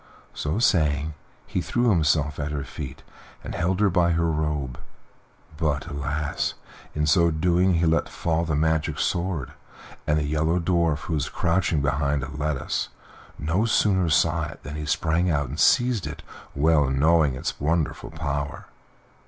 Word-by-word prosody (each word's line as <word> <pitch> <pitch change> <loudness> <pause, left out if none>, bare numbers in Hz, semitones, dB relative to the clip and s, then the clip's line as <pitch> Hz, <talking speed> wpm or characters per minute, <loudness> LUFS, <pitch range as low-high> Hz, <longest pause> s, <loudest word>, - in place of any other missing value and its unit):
So 75 +5 -2
saying, 75 - +2 0.3
he - - -2
threw 120 -1 +1
himself 75 -4 +2
at 75 0 -2
her 75 -2 -3
feet - - -8 0.4
and - - -6
held 90 +2 0
her 105 - +5
by 85 -1 +3
her 85 0 +1
robe. 75 -5 -2 0.8
But, 75 -3 0
alas! 70 +1 -2 0.4
in 75 0 +1
so 85 +3 +4
doing 90 +3 +2
he 85 +1 +2
let 80 +1 +2
fall 85 0 -1
the 80 -3 -1
magic 80 +1 +1
sword, 85 -6 -1 0.6
and 75 - +3
the 75 - 0
Yellow 80 +3 +1
Dwarf, 85 -4 +1
who 85 - -4
was 75 -3 -1
crouching 85 -4 +1
behind 70 0 0
a 70 +2 -7
lettuce, 75 -2 -2 0.5
no 85 +9 0
sooner 95 -6 +2
saw 80 0 +2
it - - -12
than 75 - -7
he 75 0 -5
sprang 85 +5 +1
out 75 -5 0
and 75 +5 -6
seized 120 - +3
it, 75 - -8 0.3
well 75 -1 +3
knowing 75 +1 +3
its - - -4
wonderful 80 +1 -1
power. 70 -3 -4
80 Hz, 160 wpm, -25 LUFS, 75-85 Hz, 0.8 s, her